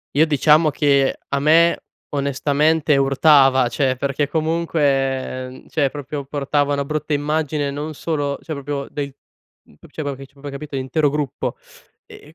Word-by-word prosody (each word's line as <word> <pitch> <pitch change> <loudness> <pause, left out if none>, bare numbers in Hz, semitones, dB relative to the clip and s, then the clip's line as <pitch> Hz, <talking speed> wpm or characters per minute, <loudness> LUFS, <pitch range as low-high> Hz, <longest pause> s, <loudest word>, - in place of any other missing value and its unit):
Io 155 +3 +5
diciamo 155 +1 +4
che, 140 -2 +2
a 140 - -1
me 165 +3 +5 0.4
onestamente 145 +2 +1
urtava, 135 -1 +4
cioè, 130 +1 0
perché 140 +1 -1
comunque, 140 -5 0
mhmm, 130 - -14
cioè, 145 -4 0
proprio 145 0 -6
portava 145 +1 -1
una 140 -1 0
brutta 155 +1 -4
immagine 150 0 0
non 150 +2 -5
solo 145 -2 -2
cioè, 160 - -6
proprio 140 -1 -4
del 140 -2 -5 0.5
mhmm, - - -23
p - - -17
cioè, 155 - -5
proprio 140 -1 -3
che 135 +1 -10
cioè, 135 - -25
proprio 140 +1 -10
hai 140 - -6
capito, 140 0 -7
l'intero 135 +3 +1
gruppo. 145 -2 -3 0.5
E 150 - -14
e 160 - -22
145 Hz, 170 wpm, -20 LUFS, 135-150 Hz, 0.5 s, Io